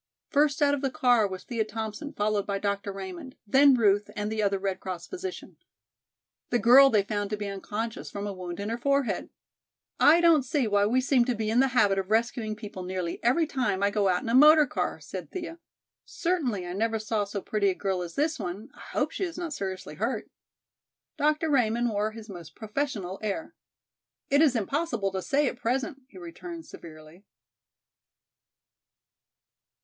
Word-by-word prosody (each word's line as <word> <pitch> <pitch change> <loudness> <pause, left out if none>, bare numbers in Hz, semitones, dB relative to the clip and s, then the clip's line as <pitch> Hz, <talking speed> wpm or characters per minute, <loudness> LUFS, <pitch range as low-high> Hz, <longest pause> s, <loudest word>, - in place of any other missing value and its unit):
First 290 0 +3
out 285 0 +4
of 285 - -1
the 270 - 0
car 245 -4 +3
was 185 -1 -7
Thea 230 -3 -1
Thompson 220 +5 -5
followed 205 -1 -1
by 200 -1 -1
Dr. 200 0 -2
Raymond, 195 +6 -8
then 270 +5 +6
Ruth 205 -3 +2
and 210 +1 -3
the 220 -1 -1
other 200 -1 +1
Red 195 -1 -3
Cross 185 -3 -6
physician. 375 0 -7 0.9
The 245 - +2
girl 250 +5 +7
they 210 -5 +3
found 205 0 -3
to 210 - -2
be 205 - -4
unconscious 210 +3 -5
from 200 0 -5
a 205 - -3
wound 180 -1 -7
in 200 +1 -3
her 230 +1 -3
forehead. 280 0 0 0.7
"I 320 +3 +7
don't 335 -3 +5
see 265 +1 0
why 205 -1 +3
we 250 +4 +2
seem 255 -1 +3
to 250 -1 0
be 215 0 -2
in 235 - +3
the 270 - +5
habit 200 -3 +4
of 190 0 -4
rescuing 225 0 0
people 210 -3 -8
nearly 180 -2 -4
every 265 +8 +3
time 250 - -1
I 200 - +3
go 205 -1 +1
out 180 -1 +1
in - - -4
a - - 0
motor 300 +3 +8
car," - - -3
said - - -8
Thea. 340 -2 -6 0.4
"Certainly 280 - -2
I 175 - -5
never 225 +3 0
saw 215 -1 -1
so 200 0 -4
pretty 200 0 0
a 185 - -1
girl 190 -2 -2
as 170 -1 -7
this 310 +2 0
one, 195 +8 -5
I - - -19
hope - - -2
she - - -3
is 345 -2 -4
not 340 -3 -4
seriously 190 - -5
hurt." 220 +6 -3 0.8
Dr. 305 +2 +1
Raymond 240 -2 +2
wore 210 +1 0
his 220 0 -11
most 175 -6 -10
professional 215 -5 -3
air. 215 +9 -3 0.8
"It 285 +2 +5
is 290 -6 +4
impossible 235 - -1
to 190 0 -3
say 285 +7 +1
at 245 - -3
present," 260 +3 -2
he 285 - -16
returned 340 -1 -8
severely. 155 +2 -13
220 Hz, 190 wpm, -27 LUFS, 200-275 Hz, 0.9 s, motor